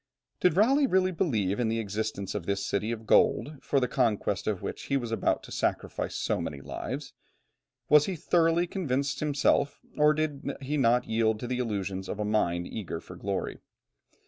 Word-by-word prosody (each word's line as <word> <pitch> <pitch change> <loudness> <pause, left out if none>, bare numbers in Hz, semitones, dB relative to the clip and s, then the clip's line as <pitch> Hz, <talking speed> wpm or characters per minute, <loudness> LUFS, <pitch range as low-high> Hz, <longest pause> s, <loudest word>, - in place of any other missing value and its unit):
Did 180 -2 +3
Raleigh 270 +7 +5
believe 185 -5 +1
really 110 - +1
in 115 +3 0
the 115 +1 0
existence 110 -2 -3
of 100 -5 -4
this 100 0 -1
city 105 +3 -1
of 115 -1 -5
gold, 145 +7 +3
for 140 - +1
the 125 - +1
conquest 110 -8 0
of 105 -4 -1
which - - -5
he 140 - +1
was 120 -3 -4
about 115 - 0
to - - -12
sacrifice - - -2
so - - -1
many 70 - -4
lives? 135 - -6 0.7
Was 150 -1 +6
he 190 - -2
thoroughly 165 +1 +2
convinced 140 -7 -1
himself, 145 -1 +1 0.2
or 150 0 +4
did 150 -3 -2
he 140 +3 -2
not 125 -3 +3
yield 110 -1 +1
to - - -3
the 125 +1 -2
illusions 100 -5 -3
of 105 - -4
a 105 - 0
mind 90 -5 +1
eager 105 -1 -5
for - - -11
glory? - - -3
125 Hz, 185 wpm, -28 LUFS, 105-150 Hz, 0.7 s, Was